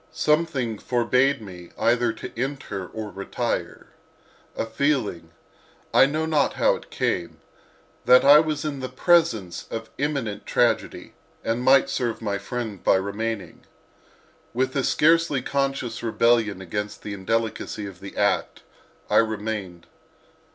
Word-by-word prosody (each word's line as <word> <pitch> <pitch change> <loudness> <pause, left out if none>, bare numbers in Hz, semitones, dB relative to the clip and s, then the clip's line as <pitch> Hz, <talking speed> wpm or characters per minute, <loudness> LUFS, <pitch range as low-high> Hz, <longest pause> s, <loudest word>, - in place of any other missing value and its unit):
Something 150 -8 0
forbade 125 +1 +1
me 90 -3 -10
either 120 0 +2
to 110 - -8
enter 120 -7 -4
or 110 +1 -7
to - - -21
retire, 100 - -3 0.7
a - - -1
feeling—I 115 - -1
know 155 +3 -1
not 155 -3 +1
how - - +3
it - - -12
came—that 85 - -1
I 145 +2 +9
was 155 -1 -1
in 145 -3 -3
the 130 -1 -4
presence 125 - +1
of 115 - -4
an 110 - -24
imminent 135 -8 -2
tragedy 120 -2 0 0.3
and 115 +2 -1
might 130 +1 +5
serve 120 -3 -2
my 100 -3 -2
friend 110 -2 -5
by - - +4
remaining. 100 +2 -3 0.9
With 130 +1 0
a 135 - +1
scarcely 160 -3 +3
conscious 135 -4 -2
rebellion 115 -3 +2
against 105 +3 -5
the 105 - -5
indelicacy 105 +1 -2
of 95 -2 -9
the 100 - -10
act - - 0 0.4
I - - +2
remained. 105 -5 -1
115 Hz, 130 wpm, -24 LUFS, 105-135 Hz, 0.9 s, I